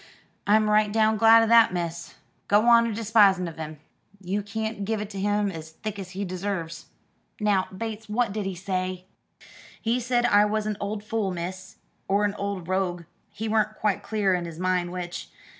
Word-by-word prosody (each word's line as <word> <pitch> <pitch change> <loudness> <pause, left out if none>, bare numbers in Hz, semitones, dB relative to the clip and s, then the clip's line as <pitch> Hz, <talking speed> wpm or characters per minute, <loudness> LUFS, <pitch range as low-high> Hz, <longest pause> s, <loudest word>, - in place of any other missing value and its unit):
"I'm 215 +1 +4
right 210 0 +3
down 220 0 +3
glad 225 +1 +7
'o - - +3
that, 230 -2 +6
miss. 170 -1 -4 0.3
Go 205 +2 +4
on 235 -1 +6
a - - -2
despising 205 -4 +3
of 165 - -8
him. 155 -1 -6 0.4
You 195 +2 -2
can't 220 0 -4
give 220 +2 -1
it 210 0 -6
him 205 +1 0
as 160 -2 -8
thick 205 +5 -7
as 190 -2 -7
he 200 - -2
deserves." 180 -3 -4 0.5
"Now, 205 -3 +2
Bates, 220 +2 -6
what 220 -1 0
did 210 -2 -3
he 190 - -4
say?" 185 0 -3 0.7
"He 230 +2 0
said 245 0 +1
I 205 -3 +5
was 215 0 -1
a 215 -1 -1
old 205 +1 -4
fool, 215 -2 -1
miss, 185 +1 -6 0.3
or 200 +2 +2
a 205 0 -1
old 200 -4 -4
rogue, 185 -2 -1 0.3
he 220 +2 -5
weren't 215 0 +1
quite 210 -2 0
clear 205 -3 0
in 175 -1 -1
his 165 -2 -8
mind 180 -1 0
which. 180 -1 -6
205 Hz, 190 wpm, -25 LUFS, 185-215 Hz, 0.7 s, glad